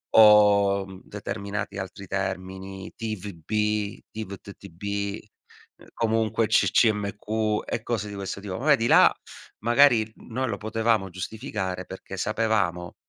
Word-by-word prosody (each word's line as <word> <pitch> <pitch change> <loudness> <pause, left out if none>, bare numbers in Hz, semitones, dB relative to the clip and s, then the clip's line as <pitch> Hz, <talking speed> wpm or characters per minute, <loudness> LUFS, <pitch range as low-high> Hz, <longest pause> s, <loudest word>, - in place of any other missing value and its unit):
o 100 -2 +6 0.2
determinati 100 0 -5
altri 95 +1 -7
termini, 95 0 -4
TVB, 105 0 -2
TVTTB, 100 -1 -5 0.7
comunque 115 0 +1
CCMQ 105 -1 +2
e 110 - -3
cose 110 -4 -2
di 100 - -7
questo 100 0 -5
tipo. 95 -2 -5
Ma 130 - -5
vedi 140 -7 +4
là - - +7 0.5
magari 120 -1 +4
noi 130 +2 -4
lo - - -2
potevamo 110 -2 0
giustificare, 95 -1 -4
perché 95 +1 -8
sapevamo 100 -4 0
105 Hz, 105 wpm, -26 LUFS, 95-110 Hz, 0.7 s, là